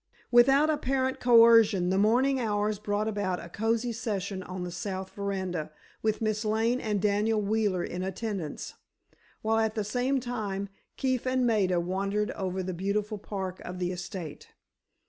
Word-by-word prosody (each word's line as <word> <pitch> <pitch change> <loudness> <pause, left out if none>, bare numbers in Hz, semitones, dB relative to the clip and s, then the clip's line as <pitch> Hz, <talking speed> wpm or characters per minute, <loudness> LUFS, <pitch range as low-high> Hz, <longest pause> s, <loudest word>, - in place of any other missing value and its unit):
Without 270 +5 +6
apparent 265 -2 0
coercion 230 -6 +6
the 190 - +2
morning 255 +6 +3
hours 210 -2 0
brought 210 0 -1
about 200 -4 -1
a 170 - -9
cozy 225 +4 0
session 200 -4 -3
on 185 0 -6
the 175 - -5
south 190 +2 -5
veranda 185 -6 -3 0.3
with 220 +1 0
Miss 215 0 0
Lane 225 +4 +1
and 210 -2 -1
Daniel 210 +2 +2
Wheeler 205 -3 0
in 180 - -4
attendance, 190 -3 -4 0.7
while 225 +1 +2
at 220 0 0
the 215 - 0
same 250 +6 0
time, 210 -5 -3 0.3
Keefe 260 -1 0
and 255 -1 +2
Maida 195 -6 +2
wandered 195 +4 -1
over 190 -1 -3
the 185 0 -3
beautiful 205 +4 -2
park 190 -2 -5
of 180 0 -7
the 180 0 -1
estate. 175 -3 -7
210 Hz, 155 wpm, -28 LUFS, 190-230 Hz, 0.7 s, Without